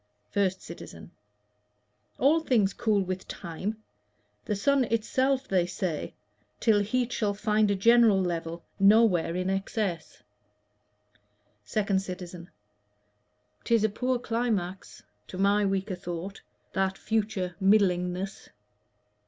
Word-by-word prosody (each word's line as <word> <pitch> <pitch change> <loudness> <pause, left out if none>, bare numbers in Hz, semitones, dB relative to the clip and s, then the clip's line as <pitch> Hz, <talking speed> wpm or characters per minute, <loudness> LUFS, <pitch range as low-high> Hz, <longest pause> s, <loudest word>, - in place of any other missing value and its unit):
1ST 190 -2 +1
CITIZEN. - - -10 1.1
All 300 +4 +4
things 230 -11 +2
cool 210 -3 +1
with 185 0 -5
time 200 +6 -5 0.6
The 210 - -1
sun 270 +6 +2
itself, 260 +4 0
they 180 -2 +1
say, 180 -4 -3 0.4
till 220 -3 +4
heat 240 +4 -1
shall 205 -2 0
find 210 0 +2
A 200 - +2
general 230 0 +5
level, 170 -2 -3 0.2
nowhere 195 -5 +4
in 185 0 -1
excess. 195 -3 -3 1.4
2D 200 - +1
CITIZEN. 180 -2 -8 1.1
'Tis 230 -2 +2
a 220 - +3
poor 250 +4 -1
climax, 225 -6 -3 0.2
to 185 - -8
my 200 +2 +3
weaker 195 +1 -1
thought, 180 +2 -6 0.3
That 190 0 0
future 210 -5 -2
middlingness. 190 -1 +1
200 Hz, 110 wpm, -28 LUFS, 185-220 Hz, 1.4 s, general